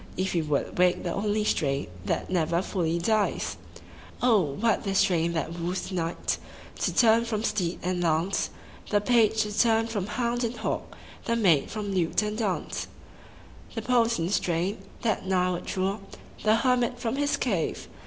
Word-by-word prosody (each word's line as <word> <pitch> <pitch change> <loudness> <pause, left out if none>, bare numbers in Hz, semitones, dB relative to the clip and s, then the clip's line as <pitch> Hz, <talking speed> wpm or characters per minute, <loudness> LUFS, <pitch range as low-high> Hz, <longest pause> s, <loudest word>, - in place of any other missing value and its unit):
If 190 +1 0
he 170 - +2
would 150 +2 -2
wake 180 0 +3
the 175 - -2
only 210 +1 0
strain 140 -8 0 0.2
That - - -2
never 170 0 +1
fully 170 -5 -1
dies! 210 +4 0 0.6
what 215 - +2
the 195 -1 -2
strain 170 -4 +2
that 165 +1 -3
woos 180 +3 -3
the - - -7
knight 170 -1 -1 0.4
To - - +1
turn 230 -1 +5
from 220 -2 -2
steed 190 -6 -1
and 180 0 -1
lance, 170 +3 +1 0.4
The 205 - +3
page 220 0 +3
to 210 -1 -5
turn 225 -1 +3
from 210 -4 -3
hound 240 +2 -1
and 235 +1 -2
hawk, - - -3 0.3
The 230 - +1
maid 180 -11 +3
from 210 -2 -4
lute 180 +2 +1
and 210 0 -2
dance; 210 -5 -2 0.9
The - - -3
potent 230 -8 +2
strain, 180 +1 0 0.2
that 215 -4 0
nigh 185 -1 +2
would 175 - -4
draw 195 +2 -1 0.4
The 215 0 +5
hermit 245 0 +2
from 245 +1 -2
his 290 0 +1
cave. 195 -10 -1
200 Hz, 165 wpm, -27 LUFS, 175-225 Hz, 0.9 s, turn